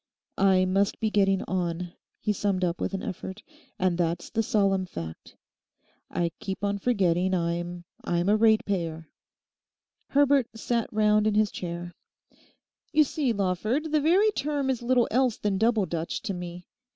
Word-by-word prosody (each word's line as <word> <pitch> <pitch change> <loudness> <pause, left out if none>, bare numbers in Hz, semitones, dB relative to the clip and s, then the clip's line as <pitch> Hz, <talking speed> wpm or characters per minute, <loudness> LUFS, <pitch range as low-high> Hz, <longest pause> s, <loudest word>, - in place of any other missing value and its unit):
'I 190 -1 +4
must 195 +2 +1
be 220 -1 0
getting 195 -2 +2
on,' 175 -1 -3 0.3
he 210 - 0
summed 195 -2 -1
up 175 -1 -1
with - - -1
an 190 - -5
effort, 190 +2 -6 0.3
'and 180 -2 0
that's 170 0 -1
the 225 - +1
solemn 195 -3 +1
fact. 80 - -8 0.7
I 170 -1 -1
keep 190 +1 -5
on 200 0 0
forgetting 190 -5 +2
I'm—I'm 175 0 -3
a 205 - +5
ratepayer!' 195 -7 +1 1.0
Herbert 280 -3 +3
sat 230 +1 -1
round 210 0 +3
in 215 - +1
his 215 -1 +3
chair. 175 0 -6 1.0
'You 310 0 +5
see, 285 -2 -1
Lawford, 215 - -1
the 305 -1 +3
very 375 +8 +4
term 285 -5 -1
is 250 - -3
little 245 0 +2
else 250 -1 +2
than 200 -2 -1
Double 225 -2 +3
Dutch 165 -1 -4
to 195 - -2
me. 175 0 -7
195 Hz, 150 wpm, -27 LUFS, 175-225 Hz, 1.0 s, a